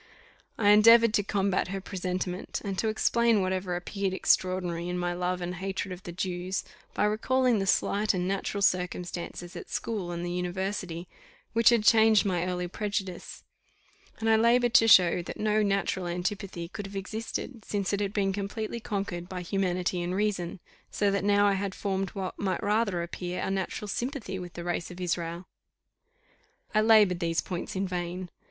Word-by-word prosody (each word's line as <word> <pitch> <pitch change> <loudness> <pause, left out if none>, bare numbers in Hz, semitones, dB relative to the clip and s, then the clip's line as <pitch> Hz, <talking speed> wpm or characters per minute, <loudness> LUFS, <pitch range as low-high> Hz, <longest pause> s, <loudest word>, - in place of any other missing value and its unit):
I 205 -2 +3
endeavoured 230 +2 +7
to 210 - +3
combat 195 -2 0
her 195 +1 -3
presentiment, 185 -1 -3
and 195 -1 -2
to 220 - +1
explain 225 -1 +2
whatever 185 -1 -1
appeared 190 +2 -2
extraordinary 180 -2 +1
in 180 - -2
my 175 0 -1
love 180 +1 -2
and 175 0 -3
hatred 190 +1 -3
of 180 0 -7
the 175 - -7
Jews, 180 +1 -3 0.3
by - - +2
recalling 245 +2 +2
the 195 - -1
slight 205 +2 +2
and 180 0 -1
natural 195 +1 -2
circumstances 180 -1 -2
at - - -8
school 205 -6 -3
and 170 0 -4
the 175 - -3
university, 180 -1 -3 0.5
which 230 0 +6
had 235 -3 +3
changed 220 -1 +5
my 180 -2 0
early 180 -1 -2
prejudice; 195 -1 -4 0.7
and 225 - -3
I 220 0 +5
laboured 240 +1 +3
to 225 - +6
show 180 -4 +6
that 170 - -8
no 215 0 +2
natural 195 -2 0
antipathy 180 0 -3
could 200 +3 -7
have 200 - -11
existed, 220 +4 -5
since 200 -1 -2
it 200 - +1
had 200 -1 -1
been 195 -2 0
completely 210 +3 -4
conquered 195 -5 -4
by 180 -1 -5
humanity 180 -1 -1
and 175 +1 -2
reason; 195 -3 -1 0.3
so 205 -1 +1
that 200 -1 0
now 205 0 +4
I 200 - +4
had 195 0 -2
formed 195 -1 -2
what 190 -2 -4
might 195 +1 -1
rather 205 -4 +1
appear 175 +1 -5
a - - -2
natural 195 +2 -3
sympathy 235 -3 -3
with 180 -1 -8
the 170 - -6
race 175 -1 -2
of 180 0 -10
Israel. 170 0 -2 1.3
I 215 - +4
laboured 215 -5 +5
these 165 -1 0
points 180 0 -5
in 190 +1 -1
vain. 180 0 -4
190 Hz, 175 wpm, -28 LUFS, 180-210 Hz, 1.3 s, endeavoured